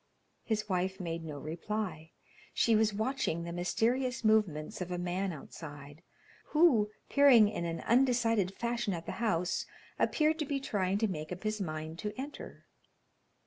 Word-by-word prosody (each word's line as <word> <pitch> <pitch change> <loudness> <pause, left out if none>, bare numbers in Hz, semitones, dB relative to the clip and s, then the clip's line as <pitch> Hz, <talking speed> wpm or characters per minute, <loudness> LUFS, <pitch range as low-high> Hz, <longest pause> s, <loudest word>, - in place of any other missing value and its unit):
His 215 -2 -1
wife 190 0 -1
made 170 -2 -4
no 150 -3 -6
reply. 165 +2 -4 0.5
She 230 - +4
was 215 0 +3
watching 215 -6 -1
the 170 - -5
mysterious 240 +9 0
movements 205 -9 +1
of 180 - -3
a 180 - -1
man 180 +2 -1
outside, 145 -1 -10 0.4
who, 290 -10 +4 0.2
peering 270 -7 +7
in 205 -5 -3
an 165 -1 -3
undecided 230 -6 +2
fashion 235 -4 -1
at 165 0 -7
the - - -4
house, 180 -6 0 0.3
appeared 315 +1 +2
to 305 - 0
be 280 0 -1
trying 200 -7 0
to 220 +1 +1
make 155 -4 -5
up 180 +2 -6
his 215 -1 -1
mind 155 -1 -4
to 210 +3 -5
enter. 285 +2 -8
205 Hz, 155 wpm, -32 LUFS, 170-230 Hz, 0.5 s, peering